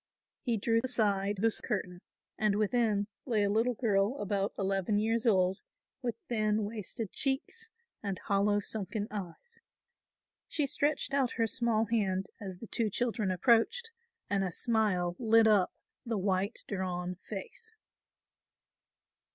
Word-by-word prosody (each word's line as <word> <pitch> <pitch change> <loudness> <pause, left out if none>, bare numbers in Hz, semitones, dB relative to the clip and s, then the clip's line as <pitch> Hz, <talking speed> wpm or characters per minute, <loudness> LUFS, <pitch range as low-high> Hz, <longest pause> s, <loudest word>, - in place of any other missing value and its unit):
He 240 -5 0
drew 225 +2 +2
aside 205 -5 +1
this 225 0 +1
curtain 180 -5 -3 0.3
and 215 -2 +2
within 215 -1 +2 0.2
lay 220 -4 +2
a 200 - +2
little 230 +3 +2
girl 210 +1 +1
about 200 -2 -1
eleven 195 +1 +1
years 225 +2 +1
old 190 -3 +3 0.4
with 240 -3 -2
thin 215 -2 +1
wasted 210 0 -5
cheeks 300 +12 -1 0.3
and 195 -2 -3
hollow 205 +1 +2
sunken 205 0 -4
eyes. 205 - -7 0.9
She 300 - 0
stretched 285 0 0
out 270 -3 +2
her 230 - +1
small 225 0 +1
hand 195 -4 0
as 190 -4 -6
the 230 - -8
two 225 0 -1
children 225 -2 0
approached 235 - +3 0.4
and 200 -1 +1
a 190 - 0
smile 185 -4 +1
lit 225 -1 +5
up 205 -4 +4 0.3
the 230 -4 -2
white 195 +2 -1
drawn 180 -2 -2
face. 445 - -8
215 Hz, 135 wpm, -31 LUFS, 195-235 Hz, 0.9 s, lit